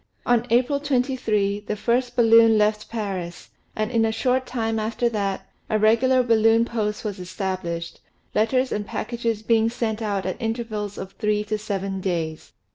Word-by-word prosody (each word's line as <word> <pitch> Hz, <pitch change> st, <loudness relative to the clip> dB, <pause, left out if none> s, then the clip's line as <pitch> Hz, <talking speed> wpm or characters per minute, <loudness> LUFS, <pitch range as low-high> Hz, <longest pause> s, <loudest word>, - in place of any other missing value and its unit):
On 240 Hz, 0 st, +2 dB
April 255 Hz, +4 st, +2 dB
23, 245 Hz, -7 st, 0 dB
the 210 Hz, -, -1 dB
first 245 Hz, +3 st, 0 dB
balloon 225 Hz, -1 st, +6 dB
left 210 Hz, 0 st, +1 dB
Paris, 190 Hz, -6 st, -5 dB, 0.2 s
and 215 Hz, +2 st, -1 dB
in 230 Hz, -2 st, +2 dB
a 225 Hz, -, +2 dB
short 255 Hz, +3 st, 0 dB
time 225 Hz, -2 st, -1 dB
after 225 Hz, +2 st, 0 dB
that, 200 Hz, -4 st, -2 dB, 0.2 s
a 215 Hz, -, +2 dB
regular 240 Hz, +4 st, +4 dB
balloon 225 Hz, -1 st, +4 dB
post 215 Hz, -2 st, -3 dB
was 205 Hz, -2 st, -4 dB
established, 180 Hz, -2 st, -4 dB, 0.3 s
letters 255 Hz, +4 st, +1 dB
and 205 Hz, -1 st, -2 dB
packages 230 Hz, -1 st, -3 dB
being 225 Hz, 0 st, +3 dB
sent 230 Hz, -2 st, -2 dB
out 200 Hz, -3 st, -2 dB
at 185 Hz, +7 st, -4 dB
intervals 225 Hz, -3 st, -3 dB
of 190 Hz, 0 st, -6 dB
three 210 Hz, 0 st, 0 dB
to 215 Hz, 0 st, -2 dB
seven 195 Hz, -2 st, -3 dB
days. 165 Hz, -4 st, -3 dB
220 Hz, 160 wpm, -23 LUFS, 205-235 Hz, 0.3 s, balloon